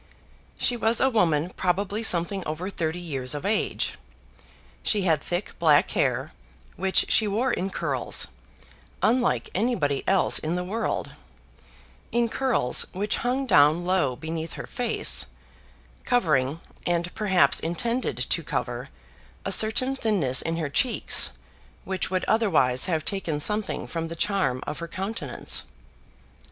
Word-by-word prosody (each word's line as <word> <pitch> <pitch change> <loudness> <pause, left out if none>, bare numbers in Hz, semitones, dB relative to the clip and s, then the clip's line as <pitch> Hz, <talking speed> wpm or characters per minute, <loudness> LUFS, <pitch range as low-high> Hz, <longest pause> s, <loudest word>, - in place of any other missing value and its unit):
She 245 - +2
was 225 0 +2
a 265 - +3
woman 175 -6 +2
probably 195 +4 -1
something 190 -2 +2
over 165 +6 -4
thirty 160 -2 -2
years 140 -6 -2
of 145 - -5
age. 215 +2 -1 0.8
She 205 -3 +2
had 160 -5 +2
thick 175 +5 -2
black 155 -4 +4
hair, - - 0 0.4
which 190 +1 +2
she 220 - +4
wore 230 +6 0
in 190 -2 -1
curls, 140 -9 -1 0.8
unlike 245 +2 +1
anybody 180 - 0
else 195 -1 +3
in 160 +3 -2
the 180 - -2
world, 215 +6 -3 1.0
in 235 0 +1
curls 250 - +1
which 205 +3 -1
hung 255 +3 -1
down 155 - +4
low 180 -9 +1
beneath 160 +3 -5
her - - -7
face, 245 -2 +1 0.8
covering, 155 - +1 0.3
and 175 0 0
perhaps 195 -4 +3
intended 230 +10 -2
to - - -1
cover, - - -4 0.6
a - - -1
certain 255 +5 +3
thinness 190 - +2
in 165 0 -2
her 160 -3 -2
cheeks 255 - +1 0.5
which 190 -1 -2
would 185 -1 -1
otherwise 160 - +2
have 160 -4 -1
taken 170 -7 -2
something 210 +7 0
from 165 -1 -4
the 165 - -7
charm 155 -9 0
of 150 - -5
her 170 - -5
countenance. 195 +6 -2
180 Hz, 135 wpm, -25 LUFS, 160-220 Hz, 1.0 s, black